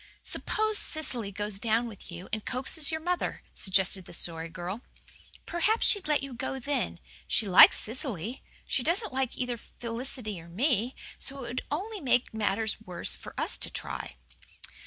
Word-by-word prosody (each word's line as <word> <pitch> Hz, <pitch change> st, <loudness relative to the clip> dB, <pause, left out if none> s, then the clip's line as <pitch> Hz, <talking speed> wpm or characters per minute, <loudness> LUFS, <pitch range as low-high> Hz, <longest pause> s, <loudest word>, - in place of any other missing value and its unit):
"Suppose 435 Hz, -1 st, 0 dB
Cecily 250 Hz, -10 st, -1 dB
goes 205 Hz, 0 st, -1 dB
down 230 Hz, +1 st, +1 dB
with 205 Hz, -4 st, -10 dB
you 175 Hz, +2 st, -8 dB
and 215 Hz, -1 st, -1 dB
coaxes 270 Hz, +5 st, +1 dB
your 315 Hz, -, -1 dB
mother," 355 Hz, +2 st, -2 dB
suggested 190 Hz, -1 st, +4 dB
the -, -, -11 dB
Story 165 Hz, -1 st, +3 dB
Girl. 185 Hz, +5 st, -5 dB, 0.6 s
"Perhaps 425 Hz, +7 st, +1 dB
she'd 405 Hz, -5 st, +3 dB
let 295 Hz, -2 st, +2 dB
you 275 Hz, -2 st, -6 dB
go 265 Hz, +2 st, -3 dB
then. 280 Hz, +2 st, -2 dB, 0.3 s
She 220 Hz, -, +2 dB
likes 185 Hz, -, +9 dB
Cecily. 230 Hz, -, -2 dB, 0.2 s
She -, -, 0 dB
doesn't 340 Hz, -, +1 dB
like 265 Hz, -2 st, -1 dB
either 245 Hz, -2 st, -2 dB
Felicity 230 Hz, -4 st, -5 dB
or 165 Hz, -, -14 dB
me, 240 Hz, -, +1 dB, 0.2 s
so 275 Hz, -1 st, -3 dB
it -, -, -6 dB
would 250 Hz, -, -3 dB
only 395 Hz, +8 st, -3 dB
make 250 Hz, -4 st, +1 dB
matters 220 Hz, +1 st, 0 dB
worse 180 Hz, -4 st, -1 dB
for -, -, -8 dB
us -, -, +1 dB
to -, -, +2 dB
try." -, -, -5 dB
240 Hz, 165 wpm, -29 LUFS, 200-280 Hz, 0.6 s, likes